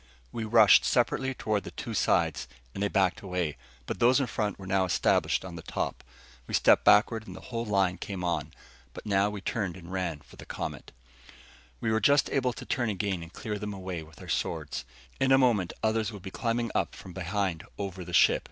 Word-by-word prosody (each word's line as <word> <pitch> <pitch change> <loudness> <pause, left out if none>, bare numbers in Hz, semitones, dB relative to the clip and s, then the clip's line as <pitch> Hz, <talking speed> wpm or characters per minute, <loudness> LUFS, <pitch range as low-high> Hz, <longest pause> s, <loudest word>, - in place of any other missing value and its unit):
We 115 - -4
rushed 110 -2 +7
separately 130 0 +1
toward 105 -3 -1
the - - -7
two 115 - -6
sides, 80 - +1 0.3
and - - -5
they 100 - +2
backed 95 -3 +1
away. 90 -5 -2 0.3
But - - -4
those 125 +3 +5
in 135 - +1
front 105 -3 -2
were 95 - -10
now 95 0 +2
established 95 - +1
on 90 -2 -7
the 80 - -7
top. - - -4 0.4
We - - -1
stepped - - +5
backward, 110 +1 +4
and 90 - -8
the - - -9
whole 115 0 -1
line 95 -4 +1
came 95 -3 -5
on. 80 -3 -1 0.4
But - - -9
now 100 -1 +2
we 105 -1 -6
turned 95 -3 -2
and 85 -1 -11
ran 90 -5 -2
for - - -18
the - - -11
Comet. - - -5 0.9
We 110 - 0
were 110 0 +2
just 145 0 +4
able 130 -2 +1
to 130 0 -9
turn 120 -2 0
again 100 -3 -2
and 85 0 -10
clear 105 +1 -5
them 105 -1 -4
away 95 -3 -5
with 80 0 -14
our - - -11
swords. - - -2 0.3
In 135 0 +2
a 135 - +7
moment 115 -9 +3
others 110 0 +1
would 100 -4 -10
be 95 - -7
climbing 115 +1 -1
up - - -1
from 90 - -11
behind 95 -2 -2
over 95 -2 -5
the 90 - -9
ship. - - +5
100 Hz, 215 wpm, -29 LUFS, 90-110 Hz, 0.9 s, rushed